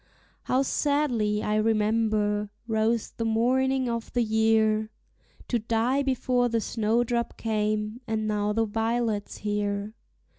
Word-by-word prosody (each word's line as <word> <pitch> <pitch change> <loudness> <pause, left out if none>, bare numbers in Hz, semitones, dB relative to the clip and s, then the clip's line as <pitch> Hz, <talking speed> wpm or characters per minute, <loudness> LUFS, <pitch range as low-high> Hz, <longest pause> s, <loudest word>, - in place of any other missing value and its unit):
How 260 +2 +2
sadly, 250 -8 0
I 210 0 0
remember, 215 -1 +1 0.2
rose 225 0 0
the 230 - -4
morning 255 +4 +1
of 235 -1 -3
the 245 - +2
year! 220 -1 +2 0.6
To 240 - +1
die 230 +5 +1
before 255 -2 +1
the 230 0 +1
snowdrop 235 +2 0
came, 215 +1 -1
and 220 -1 -1
now 210 -1 0
the 225 +1 +1
violet's 225 -1 -1
here. 205 0 -2
225 Hz, 120 wpm, -26 LUFS, 215-240 Hz, 0.6 s, How